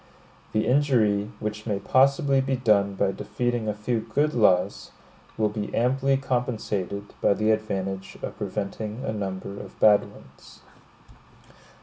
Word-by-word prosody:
The 110 - +1
injury 115 -7 +2
which 105 +1 -5
may 105 -3 0
possibly 135 +5 +3
be 135 0 0
done 105 -5 +2
by 95 0 +1
defeating 120 +3 -2
a 105 - -1
few 110 +3 -1
good 150 +7 0
laws, 95 -6 +2 0.5
will 110 - +2
be 105 -1 -4
amply 135 +3 +2
compensated 110 -7 -3
by 100 - +4
the 110 +2 +2
advantage 95 -3 -3
of - - -4
preventing 105 +4 -4
a 110 - -2
number 100 -1 -5
of 95 - -11
bad 105 -1 +5
ones. - - -17
110 Hz, 135 wpm, -25 LUFS, 100-125 Hz, 0.5 s, bad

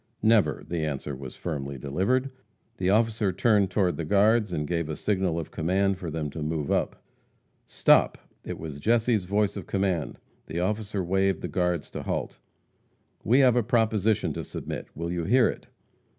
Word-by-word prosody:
"Never!" 110 -2 +3
The 85 -2 -2
answer 70 -2 -3
was 65 -1 -9
firmly 70 -5 -4
delivered. 100 - 0 0.5
The 90 0 0
officer 110 -1 +2
turned 100 0 +3
to 90 -1 +2
the 85 - -5
guards, 105 +4 +3
and 75 -3 -2
gave 85 0 -2
a 75 - -2
signal 95 -4 0
of 80 - -7
command 95 +3 0
for 85 - -5
them 75 -2 -3
to 80 - -6
move 75 -1 -2
up. - - -1 0.6
"Stop!" - - +4 0.3
It - - -5
was 75 -3 -7
Jesse's 115 +1 +2
voice 100 +1 +1
of - - -7
command. 95 -6 -1 0.3
The 80 +2 -3
officer 105 +1 -1
waved 95 0 +1
the - - -3
guards 90 -4 -1
to - - -5
halt. - - -4 0.8
"We 125 +8 +4
have 125 -3 +5
a 120 - +4
proposition 110 -2 +1
to - - -5
submit. - - -6
Will 85 +2 -4
you 85 -2 -2
hear 125 +5 +4
it?" - - -5
95 Hz, 175 wpm, -26 LUFS, 80-105 Hz, 0.8 s, have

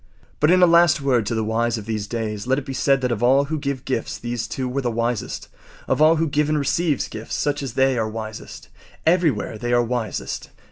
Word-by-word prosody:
But 150 - +3
in 185 +1 +5
a - - +10
last 170 -2 +5
word 125 -6 +1
to 115 - -1
the 110 - 0
wise 115 +2 0
of 105 - -7
these 105 -2 -3
days 110 -1 -4
let 130 +1 +2
it 145 - -4
be 135 - -5
said 135 0 +2
that 125 -1 0
of 115 - -2
all 130 +3 +4
who 155 +2 -3
give 140 -3 -3
gifts 130 -4 -2
these 120 -1 -4
two 130 -1 -3
were 130 +2 -2
the 125 - -1
wisest. 115 0 -2 0.4
Of - - +1
all 155 +1 +6
who 165 0 +1
give 150 +1 +1
and 155 - +2
receive 150 0 0
gifts, 110 +1 -5
such 145 0 -1
as 135 -5 -5
they 130 -1 +2
are 110 -1 -1
wisest. 110 0 -8 0.4
Everywhere 160 - +1
they 120 0 -1
are 120 0 +4
wisest. 120 -2 -3
125 Hz, 235 wpm, -22 LUFS, 115-145 Hz, 0.4 s, a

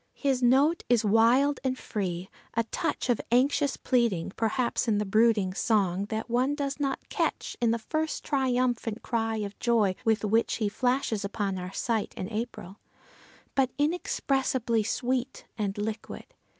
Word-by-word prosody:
His 270 -3 0
note 275 +7 +4
is 235 -2 +3
wild 235 +7 +4
and 260 -1 0
free, 185 -6 -3 0.3
a 230 - +2
touch 225 - -2
of 245 -3 +1
anxious 275 +3 +2
pleading 230 -10 +1
perhaps 235 +2 0
in 215 -2 +2
the 210 - 0
brooding 215 -2 +3
song 195 -3 +1
that 220 +1 -4
one 250 +4 +1
does 285 -1 -3
not 275 -2 -2
catch - - -1
in 235 - +3
the 230 - +2
first 310 +7 -2
triumphant 250 -4 0
cry 225 -2 -1
of 205 -2 -5
joy 225 -5 +2
with 220 -1 +2
which 225 +3 +2
he 215 -3 0
flashes 245 -2 0
upon 200 -1 -2
our 180 0 -6
sight 225 0 -2
in 185 - -3
April, 215 -3 -5 0.7
but 270 -2 +2
inexpressibly 270 -6 0
sweet 250 +4 -2
and 205 -2 -2
liquid. 210 +1 -5
230 Hz, 150 wpm, -28 LUFS, 210-260 Hz, 0.7 s, note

